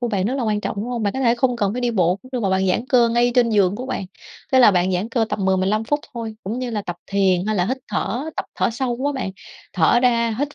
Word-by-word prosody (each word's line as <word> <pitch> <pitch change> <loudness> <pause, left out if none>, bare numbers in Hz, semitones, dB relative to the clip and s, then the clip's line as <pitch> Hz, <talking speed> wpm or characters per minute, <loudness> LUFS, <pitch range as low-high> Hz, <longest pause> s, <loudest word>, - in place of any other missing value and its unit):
của 240 - -1
bạn 195 -4 -1
rất 250 +5 0
là 270 - -2
quan 210 -2 0
trọng, - - -4
đúng 205 - -3
hông? 240 -2 -3
Bạn 200 - 0
có 265 - -3
thể 235 -2 +3
không 245 -1 +1
cần 205 -2 0
phải 250 - -3
đi 245 -1 0
bộ 180 -4 +2
cũng 255 - -14
được, 250 - -1
mà 195 - 0
bạn 190 0 +1
giãn 225 +7 0
cơ 240 -2 +4
ngay 240 +1 +2
trên 240 -2 +3
giường 200 -2 +2
của 255 - -6
bạn. 200 -7 -3 0.5
Thế 260 - +5
là 240 -4 +8
bạn 185 0 +1
giãn 185 +5 -1
cơ 230 -1 +1
tầm 195 - -2
10-15 190 +3 +1
phút 290 +6 0
thôi, 225 -2 -5
cũng 220 +6 -4
như 250 -1 -3
là 210 -2 -2
tập 175 -2 -5
thiền, 190 -1 +1
hay 215 -1 0
là 180 0 +1
hít 260 - -1
thở, 285 +7 -2
tập - - -2
thở - - +1
sâu 240 0 -2
á 290 - +1
bạn, 255 -8 -3 0.4
thở 185 +7 +3
ra 235 -3 +2
hít 290 +1 -2
225 Hz, 300 wpm, -21 LUFS, 195-245 Hz, 0.5 s, là